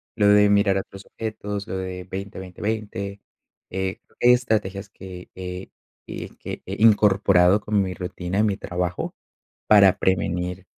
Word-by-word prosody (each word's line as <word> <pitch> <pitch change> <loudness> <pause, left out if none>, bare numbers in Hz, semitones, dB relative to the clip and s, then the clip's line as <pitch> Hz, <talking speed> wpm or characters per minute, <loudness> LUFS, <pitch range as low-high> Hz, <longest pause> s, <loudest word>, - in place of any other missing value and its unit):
lo 105 -3 +3
de 105 0 +6
mirar 100 -1 +3
otros 95 0 -10
objetos, 105 -2 -5
lo 95 - -3
de 90 -1 -5
20 95 +1 -6
20 90 -1 -10
20, 105 -2 -3 0.5
eh, 95 0 -3 0.2
estrategias 110 -5 +2
que 90 -3 -11
que- 90 0 -7 0.7
que - - -6
he - - -6
incorporado 100 -3 +5
con 105 -1 +1
mi 95 -1 -2
rutina, 90 +1 -4
en 110 - +4
mi 100 - -1
trabajo, 90 0 -3 0.5
para 100 -3 +6
prevenir, 90 0 -1
95 Hz, 140 wpm, -23 LUFS, 90-105 Hz, 0.7 s, de